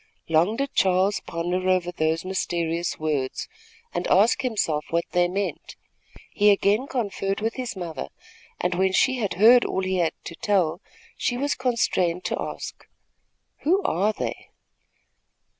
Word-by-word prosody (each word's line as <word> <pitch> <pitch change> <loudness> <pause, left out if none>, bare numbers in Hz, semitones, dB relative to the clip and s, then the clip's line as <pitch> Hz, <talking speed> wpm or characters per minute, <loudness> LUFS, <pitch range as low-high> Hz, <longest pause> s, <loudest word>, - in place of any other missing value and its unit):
Long 165 +7 +3
did 275 +2 -3
Charles 190 +2 +2
ponder 180 +2 -1
over 180 -1 +1
those 160 0 -1
mysterious 170 -2 -2
words, 150 -4 -2 0.5
and 175 +1 -2
ask 215 +8 +4
himself 200 - -1
what 170 +1 +1
they 175 0 +3
meant. 195 +3 -4 0.6
He 210 0 +4
again 205 +5 +3
conferred 200 -6 -2
with 225 +1 -1
his 255 -4 -5
mother, 170 -6 -5 0.5
and 180 0 0
when 190 +1 +1
she 260 +6 +3
had 205 -6 -1
heard 235 +6 +7
all 190 - -2
he 185 0 0
had 170 -3 +1
to - - -7
tell, 185 -4 0 0.4
she 245 - -1
was 285 +3 0
constrained 185 -8 0
to - - -2
ask: - - -7 0.7
"Who 370 +6 +2
are 205 - +1
they?" - - -5
190 Hz, 145 wpm, -24 LUFS, 170-220 Hz, 0.7 s, heard